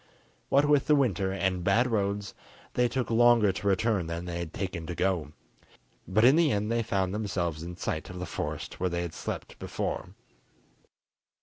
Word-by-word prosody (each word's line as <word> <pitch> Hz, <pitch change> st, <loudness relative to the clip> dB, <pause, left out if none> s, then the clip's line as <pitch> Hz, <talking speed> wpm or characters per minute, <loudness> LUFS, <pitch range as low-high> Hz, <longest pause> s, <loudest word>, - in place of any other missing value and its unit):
What 140 Hz, +2 st, +4 dB
with 145 Hz, -1 st, +3 dB
the 150 Hz, -, +5 dB
winter 100 Hz, -, +1 dB
and 95 Hz, -2 st, -1 dB
bad 105 Hz, +7 st, +3 dB
roads 100 Hz, -4 st, -1 dB, 0.4 s
they 125 Hz, 0 st, +3 dB
took 125 Hz, 0 st, -2 dB
longer 115 Hz, -3 st, +5 dB
to 95 Hz, +3 st, -4 dB
return 100 Hz, -2 st, +1 dB
than 85 Hz, +1 st, -4 dB
they 85 Hz, -1 st, -4 dB
had 85 Hz, -2 st, -5 dB
taken 90 Hz, -4 st, -4 dB
to 85 Hz, -, -4 dB
go, 85 Hz, -6 st, 0 dB, 0.7 s
but 110 Hz, +5 st, +3 dB
in 130 Hz, +4 st, +7 dB
the 165 Hz, -4 st, +4 dB
end 105 Hz, +2 st, 0 dB
they 115 Hz, 0 st, +2 dB
found 95 Hz, -4 st, -1 dB
themselves 90 Hz, -7 st, -2 dB
in 85 Hz, +1 st, -7 dB
sight 80 Hz, -3 st, -3 dB
of 90 Hz, -, -8 dB
the 90 Hz, -, -4 dB
forest -, -, -5 dB
where 90 Hz, -, +1 dB
they 85 Hz, 0 st, -2 dB
had 85 Hz, -2 st, -5 dB
slept -, -, -6 dB
before. -, -, -4 dB
95 Hz, 185 wpm, -28 LUFS, 90-115 Hz, 0.7 s, in